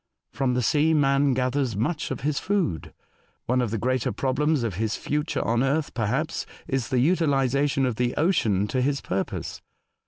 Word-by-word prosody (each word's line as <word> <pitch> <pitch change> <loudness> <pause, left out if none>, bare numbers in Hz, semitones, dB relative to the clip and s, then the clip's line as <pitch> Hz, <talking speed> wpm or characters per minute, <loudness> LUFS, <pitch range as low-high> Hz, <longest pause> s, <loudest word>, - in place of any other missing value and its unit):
From 130 -2 0
the 125 - +1
sea 155 +4 +3
man 140 -2 +3
gathers 130 -2 0
much 145 - -1
of - - -4
his 150 -1 0
food. 185 - -1 0.5
One 125 +1 +1
of 120 - -1
the 110 - -2
greater 130 +2 0
problems 140 +1 0
of 115 -4 -1
his 110 -2 0
future 150 +2 -2
on 115 +1 +1
Earth, 140 +3 0
perhaps, 125 +8 -1 0.2
is 135 -3 -1
the 130 - 0
utilisation 140 -3 +2
of 125 -4 -2
the 125 0 0
ocean 115 - +2
to 130 - 0
his 140 +2 +1
purpose. 95 +1 -4
135 Hz, 175 wpm, -25 LUFS, 120-145 Hz, 0.5 s, sea